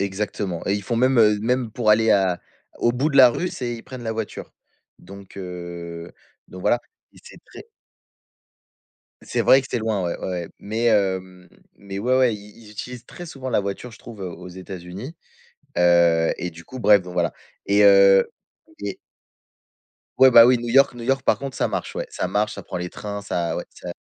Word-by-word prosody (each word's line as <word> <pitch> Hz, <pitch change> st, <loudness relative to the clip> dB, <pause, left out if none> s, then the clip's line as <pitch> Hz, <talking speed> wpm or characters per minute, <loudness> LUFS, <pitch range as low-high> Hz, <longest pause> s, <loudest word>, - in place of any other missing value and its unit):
Exactement, 100 Hz, -2 st, -3 dB
et 100 Hz, -, +1 dB
ils 100 Hz, -, -3 dB
font 115 Hz, +4 st, -2 dB
même, 130 Hz, +1 st, +3 dB
heu, 105 Hz, -2 st, +5 dB
même 125 Hz, +1 st, 0 dB
pour 110 Hz, -1 st, +1 dB
aller 110 Hz, +1 st, +4 dB
à 95 Hz, -3 st, +2 dB, 0.4 s
au 120 Hz, -, +2 dB
bout 140 Hz, +5 st, 0 dB
de 140 Hz, -, -1 dB
la 130 Hz, -3 st, +9 dB
rue, 180 Hz, +8 st, -2 dB
c'est 120 Hz, -6 st, -4 dB
ils 115 Hz, -, -10 dB
prennent 130 Hz, -2 st, -9 dB
la 110 Hz, -1 st, -3 dB
voiture, 110 Hz, -1 st, -6 dB, 0.5 s
donc, 100 Hz, 0 st, -13 dB
heu, 85 Hz, -2 st, -7 dB, 0.4 s
donc 95 Hz, -, -10 dB
voilà, 120 Hz, -, +2 dB, 0.3 s
et -, -, -19 dB
c'est -, -, -14 dB
très -, -, -13 dB, 1.6 s
C'est -, -, -2 dB
vrai 135 Hz, -, +6 dB
que 135 Hz, -, -9 dB
c'est -, -, -1 dB
loin, 110 Hz, -4 st, -1 dB
ouais, 85 Hz, -, -2 dB
ouais, -, -, -6 dB
ouais, 90 Hz, -2 st, -4 dB
mais, 110 Hz, +3 st, -3 dB
hem, 95 Hz, -4 st, 0 dB, 0.3 s
mais 100 Hz, -1 st, -8 dB
ouais, 125 Hz, +5 st, +1 dB
ouais, 130 Hz, -3 st, +3 dB
ils 105 Hz, 0 st, -15 dB
ils -, -, -13 dB
utilisent 120 Hz, +3 st, -8 dB
très 175 Hz, -, -10 dB
souvent 130 Hz, -4 st, -7 dB
la -, -, +2 dB
voiture, 100 Hz, +5 st, -4 dB
je 110 Hz, -, -15 dB
trouve, 110 Hz, -5 st, -11 dB
heu, 90 Hz, -, -4 dB
aux 90 Hz, -, -10 dB
États-Unis, 95 Hz, -, -9 dB, 0.6 s
heu, 85 Hz, -2 st, +4 dB
et 90 Hz, -, -4 dB
du 85 Hz, 0 st, -14 dB
coup 130 Hz, -, -9 dB
,bref, 105 Hz, -3 st, +5 dB
donc 90 Hz, -1 st, -10 dB
voilà, 85 Hz, -2 st, 0 dB, 0.3 s
et 100 Hz, +1 st, +3 dB
heu, 100 Hz, -1 st, +6 dB, 0.5 s
et 100 Hz, -1 st, -4 dB, 1.2 s
Ouais 130 Hz, -1 st, +7 dB
bah 115 Hz, -1 st, +10 dB
oui, 125 Hz, -1 st, +4 dB
New 120 Hz, 0 st, -5 dB
York 135 Hz, +2 st, +4 dB
New 120 Hz, -1 st, -8 dB
York 135 Hz, +1 st, +1 dB
par -, -, +2 dB
contre, 135 Hz, -1 st, -6 dB
ça -, -, 0 dB
marche, -, -, -4 dB
ouais. -, -, -4 dB
Ça -, -, -3 dB
marche, 105 Hz, +3 st, -1 dB
ça 100 Hz, -, -9 dB
prend -, -, -6 dB
les 90 Hz, 0 st, -4 dB
trains, 100 Hz, -1 st, -6 dB
ça 85 Hz, -4 st, -2 dB
ouais, -, -, -4 dB
ça -, -, -9 dB
105 Hz, 205 wpm, -22 LUFS, 95-120 Hz, 1.6 s, bah